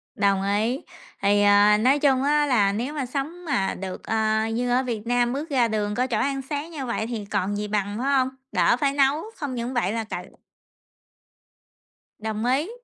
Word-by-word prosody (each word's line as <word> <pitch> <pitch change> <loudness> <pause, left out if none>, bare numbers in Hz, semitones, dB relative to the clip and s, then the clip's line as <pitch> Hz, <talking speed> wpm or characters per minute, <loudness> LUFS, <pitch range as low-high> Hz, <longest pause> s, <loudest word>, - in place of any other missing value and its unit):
Đồng 200 -1 +2
ý, 215 +7 0 0.4
thì, 205 +1 +3
ờ, 205 +1 +6
nói 265 +6 +3
chung 270 -2 +3
á 295 +1 +3
là 215 -8 +3
nếu 245 +8 -3
mà 280 -4 -2
sống 300 +7 -5
mà 260 -11 0
được, 190 -1 -7
ờ, 220 0 +1
như 245 +1 -1
ở 250 +2 +2
Việt 230 -3 -4
Nam 245 0 +2
bước 300 +4 -4
ra 250 -4 +3
đường 210 -2 -1
có 250 +3 +1
chỗ 235 -4 -1
ăn 275 0 0
sáng 300 +3 -3
như 285 -4 -5
vậy 235 -2 -2
thì 225 -4 -4
còn 200 0 -1
gì 210 0 -3
bằng, 205 0 -2
phải 275 +2 +1
hông? 260 0 +1 0.2
Đỡ 185 +4 +3
phải 275 0 +1
nấu, 280 +2 +2
không 280 -4 -4
những 240 +2 -3
vậy 235 -6 0
là 225 -1 -2
cậy 215 - -6 1.9
Đồng 220 +1 -3
ý. 270 +8 +1
240 Hz, 200 wpm, -24 LUFS, 210-275 Hz, 1.9 s, ờ